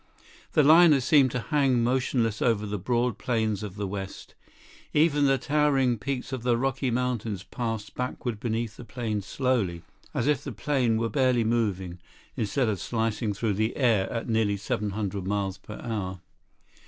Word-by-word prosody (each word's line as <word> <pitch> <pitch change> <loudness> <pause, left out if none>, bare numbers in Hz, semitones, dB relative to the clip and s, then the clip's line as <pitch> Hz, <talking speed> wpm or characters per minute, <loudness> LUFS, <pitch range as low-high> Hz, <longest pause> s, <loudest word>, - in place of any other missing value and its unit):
The 150 - +5
liner 160 0 +7
seemed 135 +1 +4
to 125 - -2
hang 135 -3 +2
motionless 120 -3 0
over 110 -3 +2
the 105 -1 -3
broad 120 +1 0
plains 110 -3 0
of 105 -3 -6
the 100 0 -3
West. 95 0 -6 0.6
Even 150 -2 +4
the 135 0 +3
towering 135 -4 +2
peaks 135 +1 -4
of 130 - -3
the 120 -1 +2
Rocky 135 +1 0
Mountains 115 -5 -2
passed 115 -2 -4
backward 125 -3 -3
beneath 115 -1 -2
the - - -9
plane 115 -3 -3
slowly, 100 -8 -1 0.3
as 120 - -1
if 145 -2 +1
the - - -5
plane 125 -6 +1
were 115 +1 0
barely 130 -2 +2
moving, 100 -6 -1 0.4
instead 115 +4 0
of 105 -4 -1
slicing 110 +2 -1
through 105 +1 -1
the 110 +3 -1
air 115 -8 +2
at 115 - -3
nearly 110 -3 +1
700 100 -1 -3
miles 100 -1 -1
per 105 - -10
hour. 100 -6 -3
115 Hz, 165 wpm, -27 LUFS, 105-130 Hz, 0.6 s, liner